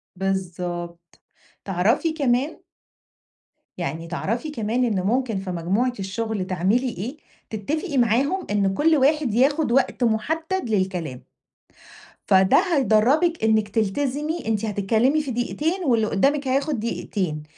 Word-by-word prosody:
بالضبط. 175 -2 -4 0.5
تعرفي 210 - +1
كمان 280 0 0 1.2
يعني 165 -1 -4
تعرفي 230 - -3
كمان 240 -1 0
إن 205 -5 0
ممكن 235 -1 0
في 190 -1 -5
مجموعة 195 +9 0
الشغل 205 0 -3
تعملي 195 +8 +1
إيه؟ 235 - -6 0.3
تتفقي 285 - -3
معاهم 265 - +1
إن 195 -2 +1
كل 315 +7 +3
واحد 280 -3 +2
ياخد 280 +2 +2
وقت 265 0 +1
محدد 320 - -1
للكلام. 180 -10 -2 1.0
فده 190 0 +5 0.2
هيدَرّبِك 275 +5 +3
إنِّك 220 -1 +3
تلتزمي 280 - -1
أنتِ 220 -1 0
هتتكلمي 220 +8 +1
في 275 -3 -5
دقيقتين 315 +10 -1
واللي 230 -4 +2
قدامِك 275 +6 +1
هياخد 275 0 0
دقيقتين، 185 -8 -3
225 Hz, 115 wpm, -23 LUFS, 195-280 Hz, 1.2 s, فده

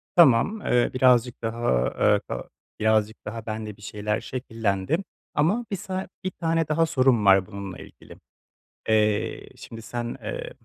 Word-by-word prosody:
Tamam, 170 - +5
eee, 120 0 +2
birazcık 125 -2 +3
daha, 115 - 0
eee, - - +4
ka - - -5 0.3
birazcık 110 0 +2
daha 110 0 -6
bende 110 -2 -5
bir 105 - -19
şeyler 105 0 -2
şekillendi. 115 0 -1 0.4
Ama 190 +11 +1
bir - - 0
sa 190 0 -4 0.2
1 185 - -2
tane 165 -2 0
daha 165 +2 +2
sorum 130 -8 +2
var 95 -1 +6
bununla 100 -2 -7
ilgili. - - -14 0.7
Eee, 105 -1 +1
şimdi 115 -1 -10
sen, 120 +1 -5
eee, - - -5
115 Hz, 145 wpm, -25 LUFS, 105-155 Hz, 0.7 s, var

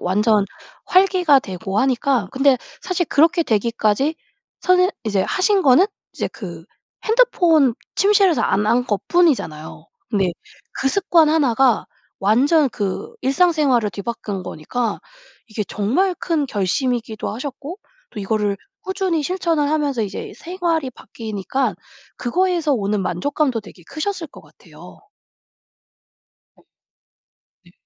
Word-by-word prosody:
완전 210 +3 +2 0.4
활기가 365 -6 +4
되고 195 -1 -4
하니까. 255 -3 +1
근데 270 0 +4 0.3
사실 365 -1 -1
그렇게 330 +5 +3
되기까지 230 +3 +1 0.5
선새 365 0 +3
이제 200 -3 +1
하신 390 0 +1
거는 290 +9 +5 0.4
이제 - - -1
그 - - -9 0.4
핸드폰 350 - +3 0.2
침실에서 395 -4 +4
안 205 +2 +1
한 245 +3 +2
것뿐이잖아요. 210 - 0 0.3
네. 190 -3 +1 0.5
그 270 - +2
습관 340 -2 +3
1 300 -6 +2
가 255 -2 +3 0.3
완전 270 - +3
그 205 - -4
일상생활을 275 - +2
뒤바꾼 200 -1 -5
거니까 215 +10 -3 0.5
이게 215 -1 -3
정말 260 - 0
큰 320 -5 -1
결심이기도 225 +1 -2
하셨고 285 - -7 0.3
또 215 - -7
이거를 205 0 0 0.3
꾸준히 375 -4 -1
실천을 330 -3 0
하면서 290 -6 0
이제 205 - -5
생활이 335 -5 -2
바뀌니까 220 0 -4 0.4
그거에서 340 +2 0
오는 205 -3 0
만족감도 250 - -1
되게 195 -3 -15
크셨을 340 +1 -3
것 - - -14
같아요. - - -16 1.6
네. - - -26 1.0
네. 175 - -21
270 Hz, 265 characters per minute, -20 LUFS, 210-335 Hz, 1.6 s, 거는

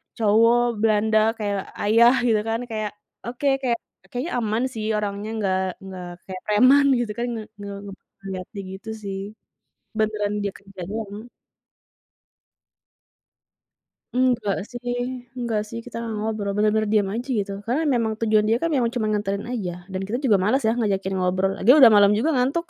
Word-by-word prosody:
cowok 230 +1 +3
Belanda 220 0 +3 0.2
kayak 205 -2 -2 0.3
ayah 230 +4 +6
gitu 220 -2 +3
kan 225 +1 0
kayak 215 -2 -2 0.4
oke, 250 +4 -2
kayak 240 -3 +1 0.3
kayaknya 255 +8 -4
aman 220 +2 0
sih 215 -1 -4
orangnya 205 0 -3
enggak 190 -3 0 0.2
enggak 185 -2 -8 0.2
kayak 185 -1 -8
preman 255 +7 +5
gitu 230 -3 -2
kan, 240 - 0
nge 220 - -4 0.2
nge 200 0 -6 0.5
ngelihatnya 190 +1 -6
gitu 190 +3 -9
sih, 195 -1 -4 0.8
beneran 215 -1 0
dia 200 - -2
kerjanya. 200 +3 -7 2.9
Enggak 250 -6 +2
sih 245 0 -4 0.4
enggak 230 -3 -1
sih 230 - -6
kita 245 - -9
gak 225 -1 -4
ngobrol, 210 -2 -2
bener-bener 215 +1 +2
diem 205 -3 +3
aja 235 +5 -4
gitu. 200 0 -2
Karena 265 +7 0
memang 225 -2 +1
tujuan 215 -1 +3
dia 225 +2 +3
kan 335 - +1 0.2
cuma 225 -3 0
nganterin 200 -1 -1
aja 180 -7 -4
dan 185 - -2
kita 235 +4 -2
juga 210 -6 +4
malas 265 +7 +2
ya 220 - +3
ngajakin 195 -4 0
ngobrol, 185 +1 +1
lagian 255 +9 +6
udah 235 - +10
malam 205 0 +6
juga 250 +10 +1
ngantuk. 280 +8 +1
215 Hz, 155 wpm, -23 LUFS, 200-235 Hz, 2.9 s, udah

